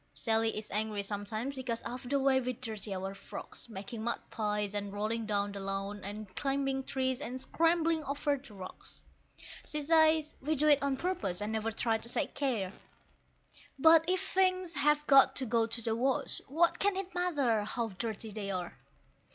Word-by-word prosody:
Sally 225 -2 +1
is 215 - -6
angry 210 -1 0
sometimes 215 +6 -3
because 245 -3 -3
of 245 +1 -6
the 280 0 +2
way 265 -1 +3
we 255 0 -2
dirty 220 -4 -5
our 190 +1 -4
frocks, 195 - -8
Making 220 +2 -6
mud 235 - 0
pies, 210 -2 -1
and 205 -1 -3
rolling 215 +2 -2
down 205 -1 0
the 200 - -6
lawn, 195 +1 -3
and 205 -1 -7
climbing 270 -1 0
trees, 260 0 -1
and 255 -2 -4
scrambling 330 +2 +2
over 285 +1 0
the 260 -6 -12
rocks. 185 -1 -8 0.6
She 300 - -1
says 315 0 +4
we 305 +4 0
do 305 +2 +3
it 290 -1 +6
on 280 -1 0
purpose, 345 - -2
and 210 +1 -3
never 220 0 0
try 225 0 +1
to 235 - -6
take - - 0
care; 225 -9 -1 1.0
But 320 +3 +7
if 375 +1 0
things 370 -2 +2
have 295 0 +3
got 275 -2 +7
to 265 - +1
go 230 -1 +2
to 230 +1 -1
the 225 0 0
wash, 260 +3 0
what 335 +5 +2
can 405 -1 +2
it 380 -2 -4
matter 285 -12 +1
how 230 +2 -2
dirty 220 +2 -5
they 205 -1 -4
are? 180 -3 -3
240 Hz, 185 wpm, -32 LUFS, 210-290 Hz, 1.0 s, But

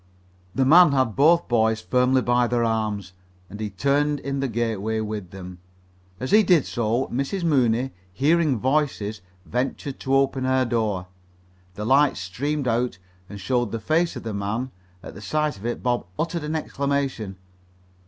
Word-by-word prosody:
The 135 - +2
man 165 +2 +7
had 130 -5 +1
both 165 +5 +4
boys 110 -2 +2
firmly 125 +3 +2
by 120 0 +2
their 120 0 +1
arms, 105 -4 -2 0.4
and 105 - -8
he 110 -1 -3
turned 140 +8 +1
in 140 0 -3
the 135 - 0
gateway 110 -2 -1
with 105 -4 -5
them. 90 -1 -10 0.6
As 130 - -4
he 215 +2 +7
did 180 -8 +3
so, 120 +2 -1
Mrs. 140 +9 -2
Mooney, 130 -5 +2 0.2
hearing 150 - +2
voices, 125 -5 -1 0.2
ventured 130 - -3
to 135 0 0
open 135 -1 +1
her 130 0 +2
door. 110 -6 -1 0.7
The 105 +2 -5
light 135 +4 +4
streamed 130 +10 -3
out 120 -3 0 0.3
and 100 - -8
showed 120 +2 0
the 115 - -3
face 160 +6 +1
of 125 - -7
the 110 -2 -4
man. 105 +6 -3 0.3
At - - -9
the - - -11
sight 150 +7 -1
of 100 +4 -6
it 120 - -4
Bob 120 -6 0
uttered 170 0 -2
an 150 +1 -3
exclamation. 140 -9 -2
125 Hz, 165 wpm, -24 LUFS, 110-140 Hz, 0.7 s, man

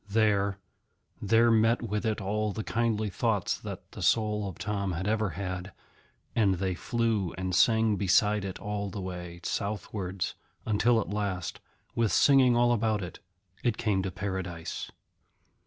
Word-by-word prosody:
There, 100 -2 +2 0.6
there 115 +3 +4
met 115 +2 +3
with 105 -1 -1
it 110 - 0
all 105 +1 -1
the 110 - -4
kindly 110 -3 0
thoughts - - 0
that - - -8
the - - -9
soul 105 -2 +2
of 90 - -10
Tom 100 -3 -2
had 95 +4 -3
ever 110 -1 +1
had, 95 -1 -4 0.6
and 100 -4 +3
they 95 +1 -1
flew 110 -2 -1
and 95 -1 -2
sang 110 +2 +4
beside 105 +2 +3
it 95 -1 -4
all 105 -1 -3
the 100 - -6
way 90 -2 -6
southwards, 100 -3 -3 0.3
until 115 +2 +3
at 105 - -3
last, 100 -4 -2 0.3
with 115 -3 +1
singing 130 -3 +5
all 120 0 +4
about 110 -3 +1
it, 90 - -8 0.4
it 120 -3 +1
came 105 -4 +1
to 95 - -2
Paradise. 95 -3 -4
105 Hz, 155 wpm, -29 LUFS, 95-110 Hz, 0.6 s, singing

